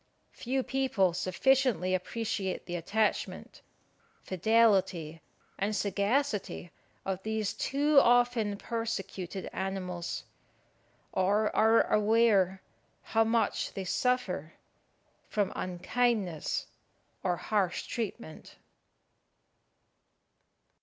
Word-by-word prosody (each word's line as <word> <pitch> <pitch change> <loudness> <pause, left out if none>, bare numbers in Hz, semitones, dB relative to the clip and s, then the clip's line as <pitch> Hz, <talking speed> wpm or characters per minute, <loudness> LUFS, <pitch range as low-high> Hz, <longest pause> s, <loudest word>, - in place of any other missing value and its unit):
Few 260 +2 -2
people 250 -11 +1
sufficiently 185 +1 +2
appreciate 190 0 -2
the 175 - -4
attachment, 210 +6 -1 0.6
fidelity, 190 -5 +2 0.4
and 205 +2 0
sagacity 205 -2 -1 0.3
of 190 -1 -2
these 220 0 -2
too 290 +1 +3
often 240 -4 +3
persecuted 195 -5 -4
animals, 185 -2 -4 0.9
or 205 +3 +1
are 225 +1 +5
aware 210 -3 +3 0.4
how 225 0 +2
much 225 -1 0
they 195 - -4
suffer 185 - -1 0.8
from 205 -3 0
unkindness 185 -1 -1 0.6
or 180 -2 0
harsh 195 -4 -1
treatment. 205 -9 -6
205 Hz, 80 wpm, -30 LUFS, 185-230 Hz, 0.9 s, are